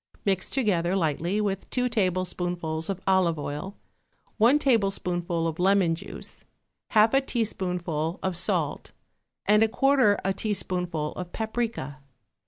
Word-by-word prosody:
Mix 195 -2 0
together 190 -8 +1
lightly 170 +3 0
with 195 -2 -2
two 250 -1 0
tablespoonfuls 180 -5 -1
of 195 -1 -3
olive 190 -4 +3
oil, 150 +7 -5 0.6
one 240 +7 +6
tablespoonful 180 - 0
of 165 0 -4
lemon 190 -2 +3
juice, 165 - -7 0.5
half 220 +1 +4
a 270 - +5
teaspoonful 180 - -2
of 190 -1 -1
salt 175 - -1 0.5
and 210 +1 +5
a 225 - +5
quarter 255 -2 +3
a 195 - +2
teaspoonful 180 -6 -1
of 180 -1 -7
paprica. 220 - -3
190 Hz, 125 wpm, -26 LUFS, 170-215 Hz, 0.6 s, one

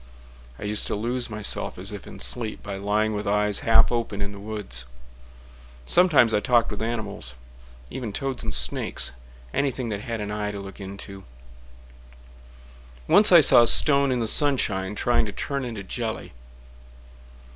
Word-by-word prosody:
I - - -11
used 105 +1 0
to - - -3
lose 120 +4 -3
myself, 110 -1 0
as - - -2
if - - -10
in - - -12
sleep, 115 -3 -1
By 100 -1 -7
lying 105 +2 -2
with 105 0 -5
eyes 105 0 0
half 115 0 +2
open 115 -4 -4
in 100 0 -5
the 100 - -12
woods. 100 - -6 1.0
Sometimes 145 - +3
I 105 - +2
talked 120 +1 0
with 105 - -7
animals—even - - -8
toads 135 +5 -4
and - - -5
snakes— 60 +1 +1 0.4
Anything 130 -3 -3
that 105 -1 -5
had 115 -1 -6
an 105 0 -6
eye 105 0 -4
to 100 - -7
look 100 +1 -11
into. 100 0 -10 1.8
Once 210 -1 +7
I 170 -2 +8
saw 130 - +7
a 120 - +3
stone 140 0 +7
in 125 - -1
the 115 - -3
sunshine 105 -9 +2
Trying 120 0 0
to - - -6
turn 140 +6 -5
into 115 -5 -7
jelly. 110 - -6
105 Hz, 160 wpm, -23 LUFS, 100-120 Hz, 1.8 s, I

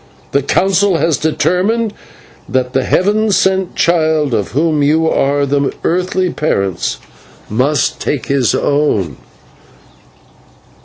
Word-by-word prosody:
The 140 - +2
Council 195 +5 +2
has 160 -1 +1
determined 200 +8 0 0.6
that 130 0 -1
the 130 -1 +1
heaven 210 +3 +1
sent 190 -1 +1
child, 155 -5 +1
of 100 -5 -2
whom 155 +1 +1
you 155 +3 +2
are 140 -2 +1
the 140 0 0
earthly 185 +1 0
parents, 100 - -1 0.5
must 135 +7 0
take 145 - -2
his 135 -4 +1
own." 110 - 0
155 Hz, 110 wpm, -15 LUFS, 140-185 Hz, 0.6 s, The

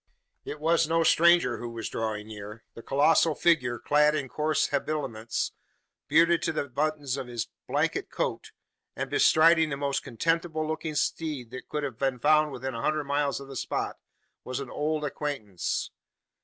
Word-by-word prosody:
It 150 - -6
was 165 +1 +2
no 165 0 +3
stranger 170 -6 +4
who 120 - -5
was 115 -1 -5
drawing 110 -2 -3
near. 105 +1 -9
The 115 - -10
colossal 150 +4 +3
figure, 125 -8 +2
clad 150 +5 +3
in 140 -4 -3
coarse 155 +2 0
habiliments, 135 -6 -2 0.6
bearded 165 +2 +4
to 165 - 0
the 150 -2 -2
buttons 145 0 -1
of 135 -2 -5
his 120 -2 -4 0.2
blanket - - 0
coat, - - -3 0.4
and - - -4
bestriding 160 0 +5
the 140 - -3
most 140 -1 -1
contemptible 160 +4 -1
looking 155 0 -3
steed 145 -6 -2
that 130 -1 -9
could 150 -1 -2
have 130 -5 -5
been 135 -2 0
found 150 +3 +3
within 130 0 -5
a 115 - -4
hundred 155 +3 0
miles 140 0 0
of 140 - -10
the 135 - -9
spot, - - -3 0.5
was 130 +1 -4
an 135 -2 -6
old 150 0 -1
acquaintance. 135 - -3
145 Hz, 170 wpm, -28 LUFS, 125-155 Hz, 0.6 s, bestriding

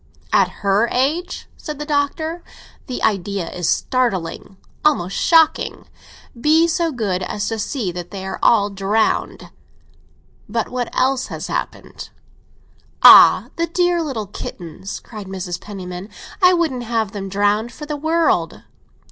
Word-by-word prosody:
"At - - +4 0.2
her 200 +4 +3
age?" 320 +8 -1
said 300 -3 -7
the 300 - -5
Doctor. 310 +3 -1 0.4
"The 250 - -5
idea 200 -3 0
is 180 -2 -2
startling—almost 195 - -1
shocking. 325 -2 +2 0.5
Be 310 +7 +3
so 335 0 0
good 205 -8 -2
as 205 +3 -3
to 225 -1 -3
see 215 -4 -2
that 175 0 -7
they 190 -1 -7
are 190 - -5
all 205 -3 +4
drowned. 200 +3 -1 1.0
But 230 +1 -2
what 250 -1 -3
else 260 0 +1
has - - -6
happened?" - - -5 0.9
"Ah, - - +9
the 335 0 0
dear 350 0 +1
little 265 -9 -3
kittens!" 190 -1 -8
cried 215 -4 -10
Mrs. 185 -2 -5
Penniman. 185 -1 -8 0.3
"I 365 0 +6
wouldn't 315 -8 -1
have 225 -3 -1
them 195 -2 -6
drowned 205 +4 +1
for 300 - -9
the 300 0 -4
world!" 320 +3 0
230 Hz, 135 wpm, -19 LUFS, 195-300 Hz, 1.0 s, Ah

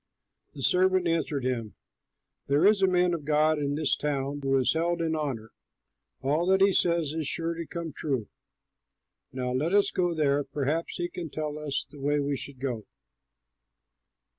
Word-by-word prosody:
The - - -6
servant 185 0 +3
answered 155 -5 -1
him, 115 -5 -2 0.7
"There 145 +5 +3
is 205 -1 +5
a 190 - +5
man 180 -1 +3
of 165 -3 -3
God 155 +1 +2
in 145 -1 -1
this 150 -1 +2
town 145 -1 -2
who 135 0 +2
is 130 - +3
held 170 +2 0
in 160 -1 0
honor; 130 -8 -3 0.7
all 150 +6 +1
that 190 0 +4
he 195 0 +5
says 170 -5 +2
is 160 -3 -2
sure 165 +1 0
to 165 -1 -6
come 170 -3 -5
true. 135 -9 -2 1.0
Now 125 -1 -3
let 150 +9 0
us 205 - +4
go 175 -2 0
there; 145 -2 +2
perhaps 150 +4 -2
he 175 - -2
can 175 -2 -6
tell 150 0 -4
us 145 -3 -2
the 140 +1 -14
way 145 +2 +1
we 140 0 0
should 135 -1 -6
go." 125 -5 -4
150 Hz, 175 wpm, -28 LUFS, 140-170 Hz, 1.0 s, is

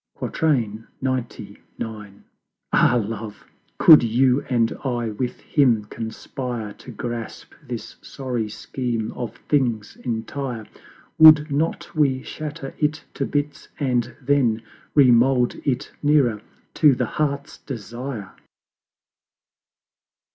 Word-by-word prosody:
XCIX. 115 -8 0 1.9
Ah 120 - +5
Love! 110 -2 -4 0.3
could 155 -2 +9
you 125 +3 +3
and 115 -3 +1
I 120 -4 -1
with 120 +4 -4
Him 120 -8 +2
conspire 115 0 -5
To 125 - -14
grasp 120 -1 -6
this 125 -6 -7
sorry 125 -5 -4
Scheme 115 -2 -3
of 115 -3 -6
Things 120 -7 0
entire, 120 0 -4 0.5
Would 155 -1 +8
not 155 +4 -1
we 135 -4 +2
shatter 150 -2 -6
it 155 0 0
to - - -2
bits 145 0 -2
and 125 -4 0
then 125 -5 +1 0.3
Re 135 -4 +7
mold 125 +1 +3
it 130 -4 -1
nearer 140 -8 +3 0.3
to 150 -4 +5
the - - 0
Heart's 140 -1 -2
Desire! 120 -3 -6
125 Hz, 105 wpm, -23 LUFS, 115-140 Hz, 1.9 s, could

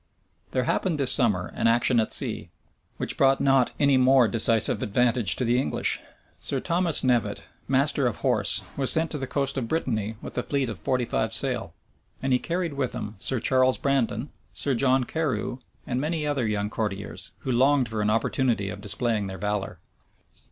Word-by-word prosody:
There 130 - -1
happened 160 +4 -1
this 135 -2 +5
summer 105 -9 +2
an - - +1
action 120 +1 +3
at 110 - 0
sea, - - -1 0.5
which - - -4
brought 135 0 +4
not 135 -2 +3
any 140 -2 +4
more 130 -1 +5
decisive 115 -1 +4
advantage 120 -1 +2
to 125 - -2
the 120 +2 +2
English. - - -1 0.4
Sir 135 - -1
Thomas 170 +1 +2
Knevet, 125 -4 0 0.2
master 135 0 +2
of 120 - -2
horse, 100 -6 +2
was 135 -2 +1
sent 160 0 +3
to 150 - -2
the 135 - -4
coast 140 +1 -1
of 120 - -4
Brittany 110 -8 -2
with - - -9
a - - +1
fleet 135 0 -2
of 105 -6 -7
forty 125 +6 -1
five 110 -1 -1
sail; 115 -7 -2 0.4
and 135 -1 0
he 125 - +3
carried 170 0 -3
with 135 -3 -2
him 105 - -5
Sir 130 +5 -1
Charles 130 +2 +2
Brandon, 135 -2 -1 0.2
Sir 140 - -1
John 130 +1 +2
Carew, 145 -3 -3 0.3
and 125 0 -2
many 155 +1 -2
other 140 -6 -1
young 105 0 -2
courtiers, 105 -3 -4
who 130 - -3
longed 130 +1 +3
for 110 -1 -3
an 105 - +1
opportunity 115 -1 0
of 100 0 -7
displaying 105 0 -1
their 95 0 -7
valor. 105 +1 -3
125 Hz, 185 wpm, -25 LUFS, 110-135 Hz, 0.5 s, this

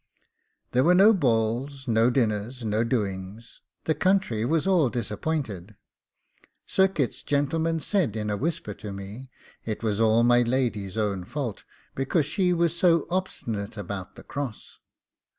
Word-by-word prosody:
There 125 +1 +3
were 175 +4 +5
no 205 +4 +7
balls, 130 - 0
no 115 +1 +4
dinners, 115 0 -1
no 110 +1 +1
doings; 105 -2 -4 0.2
the 160 - +1
country 185 - +1
was 155 +7 +1
all 180 -9 +3
disappointed 115 - -3 0.9
Sir 190 0 +3
Kit's 155 -10 -2
gentleman 160 +3 0
said 160 - 0
in 105 -1 -2
a - - 0
whisper 135 -4 -2
to 105 +1 -8
me, 100 +7 -8 0.3
it 110 0 -4
was 105 -2 0
all 115 +1 +4
my 120 0 +5
lady's 115 -6 -1
own 100 -4 -1
fault, 125 +1 -5 0.3
because 135 +3 +1
she 180 +4 +1
was 170 -1 +1
so 170 -3 +3
obstinate 115 - -3
about 100 -2 -6
the - - -12
cross. 140 -6 -6
120 Hz, 145 wpm, -26 LUFS, 105-160 Hz, 0.9 s, no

